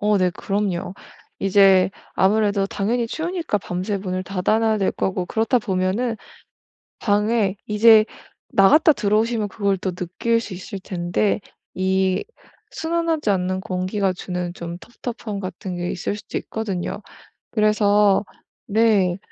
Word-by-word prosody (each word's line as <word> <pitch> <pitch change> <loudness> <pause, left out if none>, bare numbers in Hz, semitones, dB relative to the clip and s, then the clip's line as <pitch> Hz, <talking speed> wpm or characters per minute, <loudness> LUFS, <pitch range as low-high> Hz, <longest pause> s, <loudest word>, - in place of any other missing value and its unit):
어 210 0 +3
네, 185 -1 +2
그럼요. 195 -1 -2 0.5
이제 195 -1 +5 0.2
아무래도 200 0 +2
당연히 230 +4 -1
추우니까 330 - -2
밤새 185 +3 -3
문을 185 -1 -3
닫아 195 +4 0
놔야 220 -1 +2
될 195 - +1
거고 185 -1 -2
그렇다 225 +3 +1
보면은 210 +3 -1 0.8
방에 210 -1 +1
이제 215 +1 +6 0.4
나갔다 275 +8 +5
들어오시면 215 0 +1
그걸 200 -1 0
또 185 0 -3
느낄 205 +6 -1
수 215 - -8
있을 190 +1 -7
텐데 185 +4 -1 0.3
이 190 0 +1 0.5
순환하지 325 -6 -1
않는 185 0 0
공기가 190 0 -1
주는 180 -1 -4
좀 170 0 -6 0.2
텁텁함 225 -4 -4
같은 185 -1 -6
게 175 0 -3
있을 200 +3 -3
수도 - - -5
있거든요. 200 -2 -4 0.5
그래서 210 -2 +3 0.4
네. 200 -4 +3
200 Hz, 275 characters per minute, -22 LUFS, 185-220 Hz, 0.8 s, 이제